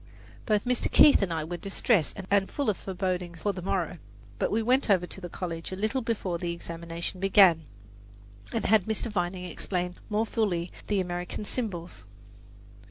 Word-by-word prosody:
Both 210 -3 +2
Mr. 250 0 0
Keith 290 - +7
and 195 -3 0
I 160 -1 -1
were 175 +3 -4
distressed 195 - +1
and 200 -1 +3
full 280 -7 0
of 200 - -7
forebodings 180 -3 -3
for 205 - +1
the 185 - -6
morrow; 180 -2 -2 0.4
but - - +1
we 225 +1 +1
went 255 +2 +2
over 185 -3 +4
to 190 - -6
the 175 - -6
college 165 -1 -5
a - - -3
little 220 +7 -1
before 200 -7 -2
the 175 -1 -2
examination 170 +1 -6
began, 190 -4 +5 0.9
and 225 - -2
had 215 -3 +4
Mr. 220 +1 -1
Vining 180 -1 -2
explain 180 +1 -3
more 215 +1 +1
fully 185 -7 -1 0.2
the 205 -2 +1
American 175 +3 -4
symbols. 180 - -4
185 Hz, 170 wpm, -28 LUFS, 175-215 Hz, 0.9 s, Keith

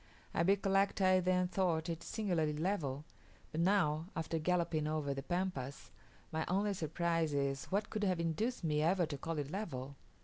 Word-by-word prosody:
I - - +1
recollect 195 +2 +3
I 185 -1 +5
then 180 0 +2
thought 175 -3 +1
it 165 -1 -3
singularly 165 -8 -1
level; 155 -5 -1 0.5
but 160 - -1
now, 170 -4 +2
after 165 -1 -1
galloping 170 -2 +1
over 155 -2 -1
the 135 - -4
Pampas, 175 -5 -3 0.4
my 160 0 0
only 200 +3 +1
surprise 165 -2 0
is, 140 -1 0
what 205 +3 -1
could 215 -1 -2
have 185 -3 +1
induced 175 +9 -1
me 150 -2 +1
ever 175 +3 +3
to 150 -2 -5
call 165 +1 -3
it 145 -1 -3
level. 140 -9 -4
170 Hz, 170 wpm, -35 LUFS, 150-185 Hz, 0.5 s, I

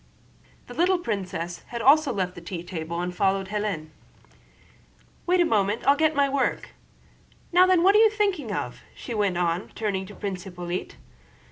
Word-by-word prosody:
The - - -10
little 365 +2 +2
princess 185 - -4
had 235 - -5
also 280 +4 +5
left 185 -5 -2
the 175 - -10
tea 170 0 -6
table 170 -1 -5
and 180 0 -4
followed 195 0 +1
Hélène. 205 -7 -3 1.4
"Wait 360 +1 +3
a 350 - +5
moment, 210 -4 0
I'll 280 - +6
get 315 +1 +2
my 280 0 +3
work.... 275 -1 -1 0.8
Now 360 +1 +6
then, 365 -2 +4
what 390 +2 +6
are 420 - +6
you 445 0 +7
thinking 400 - -1
of?" - - -4
she 240 - -7
went 200 -5 0
on, 175 +2 -1
turning 195 -3 -2
to 205 - -11
Prince 190 -2 -4
Hippolyte. 175 -1 -5
205 Hz, 170 wpm, -25 LUFS, -, 1.4 s, you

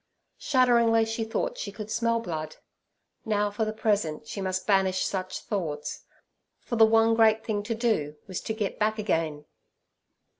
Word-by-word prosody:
Shudderingly 235 -4 +4
she 225 0 -2
thought 225 - -2
she 200 - -4
could 215 +1 -8
smell 230 0 +1
blood. 160 -7 -5 0.7
Now 210 -2 0
for 220 +2 -1
the 215 - -2
present 200 -9 -1
she 200 - -5
must 185 0 -2
banish 190 -2 +2
such 185 -1 -3
thoughts, 165 -9 -4 0.5
for 235 - -4
the 225 -1 +7
one 225 0 +4
great 220 -1 +4
thing 210 -2 -1
to 225 +3 -3
do 215 -11 0
was 185 -3 -5
to 220 - -3
get 210 -3 -3
back 215 +1 +1
again. 160 -8 -1
215 Hz, 160 wpm, -27 LUFS, 185-225 Hz, 0.7 s, the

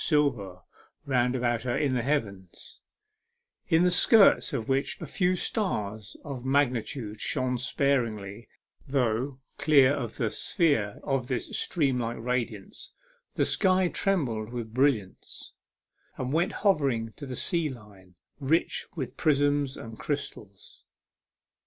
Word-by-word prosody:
silver 125 - +1 0.5
round 125 -2 +1
about 120 -2 0
her 120 -1 -1
in 140 -3 +1
the 125 - +1
heavens, 105 - -4 0.9
in 165 0 +4
the 180 - +3
skirts 215 +2 +6
of 110 - -3
which 135 +1 0
a 165 - -6
few 180 +4 +1
stars 110 - -3
of 135 -4 -6
magnitude 125 -5 -1
shone 130 -3 0
sparely, 120 -5 -1 0.4
though, 130 0 0 0.2
clear 140 -3 +5
of 120 -6 -4
the 115 -4 -1
sphere 140 - +1
of 135 -3 -1
this 125 -3 -3
steam 140 -7 +1
like 120 0 -3
radiance, 115 -4 -4 0.4
the - - +2
sky 185 -1 +3
trembled 125 - -1
with 115 -3 -6
brilliants, 125 -7 -1 0.6
and 130 +1 -3
went 170 +2 +2
hovering 135 - +2
to 140 - -8
the 130 - -5
sea 170 0 0
line, 100 -7 -13 0.2
rich 155 +4 0
with 135 -7 -5
prisms 145 -2 +1
and 115 -1 -9
crystals. 105 -9 -6
130 Hz, 125 wpm, -27 LUFS, 115-145 Hz, 0.9 s, skirts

